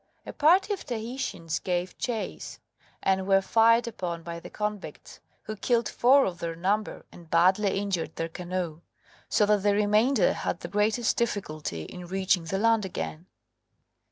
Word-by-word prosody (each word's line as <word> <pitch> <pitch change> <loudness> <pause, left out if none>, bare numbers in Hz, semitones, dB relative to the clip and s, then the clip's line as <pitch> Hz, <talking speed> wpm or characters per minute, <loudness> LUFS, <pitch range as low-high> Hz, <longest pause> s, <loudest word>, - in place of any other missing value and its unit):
A - - -7
party 360 +7 +4
of 390 - -6
Tahitians 230 -8 -4
gave 180 0 -2
chase, 230 -4 -4 0.5
and 190 0 +1
were 195 -1 +5
fired 230 +4 +4
upon 175 -7 -5
by 170 0 -6
the - - -11
convicts, 210 -2 -6 0.2
who 215 - -6
killed 235 +2 +1
four 270 +3 +4
of 175 -2 -4
their 165 -1 -4
number 200 +5 -1
and 170 -2 -15
badly 190 +4 +3
injured 195 -4 -2
their 165 - -2
canoe, 175 -1 -4 0.5
so 210 - +3
that 210 -1 +2
the 205 0 +2
remainder 210 +2 +3
had 175 - -3
the - - -5
greatest 210 +4 +1
difficulty 155 - -3
in 180 - -9
reaching 190 -2 +1
the 195 +4 -2
land 225 +1 +3
again. 80 - -5
195 Hz, 155 wpm, -27 LUFS, 175-220 Hz, 0.5 s, were